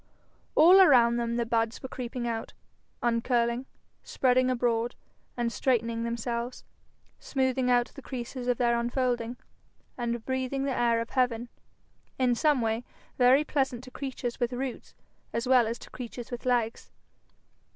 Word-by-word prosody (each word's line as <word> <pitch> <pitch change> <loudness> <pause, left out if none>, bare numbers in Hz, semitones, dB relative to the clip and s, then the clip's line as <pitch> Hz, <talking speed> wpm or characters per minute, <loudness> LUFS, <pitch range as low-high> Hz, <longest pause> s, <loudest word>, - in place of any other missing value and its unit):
All 360 +5 +8
around 240 -8 +6
them 235 0 -1
the 235 0 0
buds 225 0 -1
were - - -4
creeping 245 -1 -5
out, 225 -1 -4 0.5
uncurling, 235 +1 +1 0.3
spreading 255 0 +2
abroad, 240 -1 0 0.5
straightening 230 0 0
themselves, 235 +1 -3 0.6
smoothing 260 -2 0
out 245 0 +3
the 275 - -10
creases 255 -1 -6
of 245 -1 +2
their 240 -1 +2
unfolding, 240 -1 -1 0.6
and 235 -1 -2
breathing 260 +1 -1
the 275 -2 -1
air 235 -1 +2
of 230 - -6
heaven 245 -2 0 0.7
in 255 -2 +3
some 290 +1 +2
way 225 +1 -1 0.4
very 255 +4 +6
pleasant 265 -5 -1
to 255 - -12
creatures 255 -3 -5
with 240 0 0
roots 255 0 -5 0.4
as 230 +2 -2
well 250 -3 +5
as 230 +2 -3
to - - -14
creatures 245 -1 -8
with 245 +1 -5
legs. 235 -2 0
245 Hz, 140 wpm, -28 LUFS, 235-255 Hz, 0.7 s, All